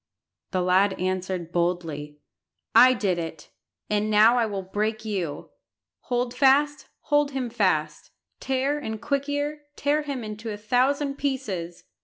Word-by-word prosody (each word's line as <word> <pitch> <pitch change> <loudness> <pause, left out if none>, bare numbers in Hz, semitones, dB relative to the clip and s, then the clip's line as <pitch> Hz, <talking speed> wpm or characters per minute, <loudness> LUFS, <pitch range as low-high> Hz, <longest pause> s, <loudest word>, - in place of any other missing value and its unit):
The 185 -1 0
lad 190 +2 +3
answered 185 -2 -2
boldly 165 -4 -2 0.6
"I 255 +1 +8
did 195 -5 0
it, 160 -2 -7 0.4
and 210 0 0
now 215 +3 +6
I 235 -2 +2
will 200 -2 -4
break 215 +4 -2
you. 180 -9 -4 0.5
Hold 245 0 -1
fast, 290 +2 +3
hold 290 -1 +1
him 255 -3 -3
fast; 175 -9 0 0.3
Tear 270 +2 0
and 220 -6 -5
Quick 280 +2 -1
ear, 290 +1 -2
tear 290 +2 +1
him 280 -5 -4
into 215 +1 -6
a 210 - -4
thousand 275 +6 +1
pieces!" 205 -12 -3
215 Hz, 140 wpm, -25 LUFS, 185-270 Hz, 0.6 s, I